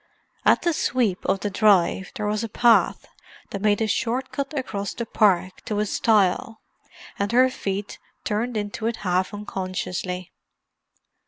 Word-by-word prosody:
At - - +4
the 340 - +2
sweep 235 -10 0
of 195 - +1
the 205 - -2
drive 195 -2 +3
there 210 - -3
was 210 +1 -1
a 230 - -4
path 235 +2 +3 0.5
that 200 - -4
made 210 +1 +2
a - - 0
short 250 +4 -1
cut 280 -1 -3
across 205 -6 -3
the 235 - -3
park 190 -4 +2
to 210 - -2
a 210 - +1
stile, 215 0 +1 0.6
and 200 +1 0
her 255 +2 +5
feet 200 -3 -4 0.2
turned 225 +2 -1
into 205 +1 -3
it 230 - -1
half 185 +1 +1
unconsciously. 185 -3 -4
210 Hz, 155 wpm, -24 LUFS, 195-230 Hz, 0.6 s, her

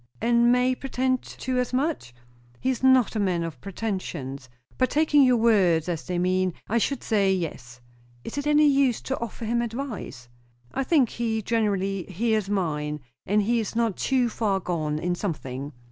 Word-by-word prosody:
"And 235 +1 +4
may 250 +1 +3
pretend 255 0 -1
to 255 -1 -3
as 250 0 -2
much?" 270 - -1 0.5
"He 260 - +1
is 255 - -4
not 260 -3 +4
a - - 0
man 180 -4 +1
of 160 -7 -6
pretensions. 175 - -5 0.3
But, 255 -1 +3
taking 300 0 +4
your 255 -2 +5
words 190 -8 +3
as 170 -3 -3
they 180 - -2
mean, 185 0 +1
I 230 +3 +1
should 275 +4 -1
say, 200 -4 +2
yes." 125 -10 -4 0.4
"Is - - -7
it 285 0 -2
any 300 0 +5
use 275 -4 +3
to 265 - -3
offer 235 0 -5
him 235 +2 +1
advice?" 230 - -5 0.5
"I 270 - 0
think 265 -4 +3
he 225 -2 -2
generally 195 -4 0
hears 215 +1 -1
mine 150 -6 -1 0.3
if 210 +2 +3
he 235 +3 +1
is 220 0 -4
not 230 -4 +1
too 255 -2 +1
far 210 -4 0
gone 155 -5 -2
in 175 +3 -1
something." 145 -7 -4
220 Hz, 175 wpm, -25 LUFS, 180-250 Hz, 0.5 s, your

